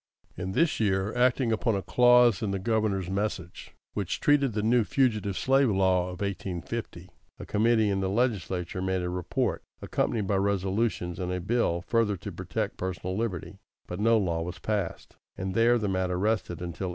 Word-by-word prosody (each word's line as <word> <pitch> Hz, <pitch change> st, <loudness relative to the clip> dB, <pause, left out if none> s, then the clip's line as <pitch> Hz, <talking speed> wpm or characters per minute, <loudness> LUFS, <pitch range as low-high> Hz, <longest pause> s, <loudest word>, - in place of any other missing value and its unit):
In 95 Hz, +2 st, -4 dB
this 165 Hz, -, +2 dB
year, 95 Hz, -1 st, +1 dB
acting 125 Hz, -1 st, +2 dB
upon 115 Hz, 0 st, +1 dB
a 95 Hz, -, -2 dB
clause 125 Hz, -4 st, +5 dB
in 105 Hz, -, -1 dB
the 100 Hz, -, -1 dB
Governor's 100 Hz, -2 st, 0 dB
message, 95 Hz, -3 st, -4 dB, 0.2 s
which -, -, -2 dB
treated 145 Hz, -1 st, +4 dB
of 120 Hz, -, -6 dB
the 105 Hz, 0 st, -1 dB
new 120 Hz, +1 st, +4 dB
Fugitive 110 Hz, -6 st, 0 dB
Slave 135 Hz, -1 st, +3 dB
Law 95 Hz, -2 st, +2 dB
of 90 Hz, +1 st, -8 dB
1850, 95 Hz, -6 st, -5 dB, 0.3 s
a -, -, -8 dB
committee 110 Hz, 0 st, +2 dB
in 95 Hz, -, 0 dB
the 95 Hz, -1 st, -1 dB
legislature 95 Hz, -6 st, -1 dB
made 95 Hz, -1 st, -1 dB
a 90 Hz, -, -2 dB
report, 90 Hz, -1 st, -1 dB, 0.2 s
accompanied 110 Hz, -4 st, -1 dB
by 100 Hz, 0 st, +1 dB
resolutions 95 Hz, -2 st, -1 dB
and 90 Hz, -1 st, -2 dB
a 90 Hz, -, -1 dB
bill 90 Hz, -3 st, 0 dB
further 110 Hz, -3 st, +1 dB
to -, -, -7 dB
protect -, -, -4 dB
personal 95 Hz, 0 st, -3 dB
liberty; 105 Hz, -5 st, -4 dB, 0.3 s
but 90 Hz, -, -6 dB
no 115 Hz, +2 st, +4 dB
law 85 Hz, -5 st, 0 dB
was 90 Hz, +1 st, -5 dB
passed, 105 Hz, -5 st, -3 dB, 0.2 s
and 95 Hz, 0 st, -3 dB
there 115 Hz, +3 st, +4 dB
the 105 Hz, -3 st, -1 dB
matter 95 Hz, -1 st, 0 dB
rested 100 Hz, -4 st, -1 dB
until 90 Hz, +2 st, -4 dB
1855. -, -, -3 dB
100 Hz, 185 wpm, -28 LUFS, 90-115 Hz, 0.3 s, clause